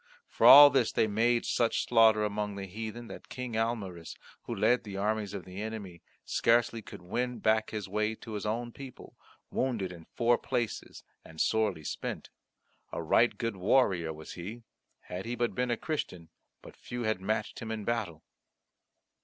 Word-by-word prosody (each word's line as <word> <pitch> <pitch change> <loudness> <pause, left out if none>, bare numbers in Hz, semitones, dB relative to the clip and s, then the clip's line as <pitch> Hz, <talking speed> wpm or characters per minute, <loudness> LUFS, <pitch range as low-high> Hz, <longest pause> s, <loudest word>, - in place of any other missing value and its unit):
For - - +3
all 145 0 +11
this 130 -4 +2
they - - +2
made 115 +3 +1
such 115 -1 +1
slaughter 110 -2 +5
among 105 -1 -2
the 100 0 -5
heathen 110 +4 -6
that - - -10
King 125 -2 -6
Almaris, 105 -7 -3 0.3
who - - -4
led 125 0 +2
the 100 -3 -7
armies 105 0 -1
of 95 - -6
the 95 +2 -7
enemy, 105 -6 -6 0.2
scarcely 115 0 +2
could 90 - -11
win 125 +7 -2
back 110 0 +1
his 105 -3 -5
way 105 +3 -1
to 110 - -11
his 105 -2 -4
own 120 +3 -2
people, 135 0 -11 0.4
wounded 115 -8 -1
in 85 -2 -11
four 120 0 +3
places 120 -4 -3 0.2
and 80 0 -13
sorely 105 -8 +1
spent. - - -5 0.6
A - - -4
right 120 +9 +3
good 115 -4 -3
warrior 95 -5 +2
was 80 0 -9
he; 105 +7 -8 0.4
had 90 +2 -7
he 120 - -2
but 120 0 -1
been 125 0 -1
a 120 - 0
Christian 95 - -4 0.3
but - - -12
few 120 0 -6
had 110 -4 -1
matched 110 +2 -2
him 115 - -6
in 110 -2 -4
battle. 105 -10 -2
110 Hz, 175 wpm, -30 LUFS, 95-120 Hz, 0.6 s, all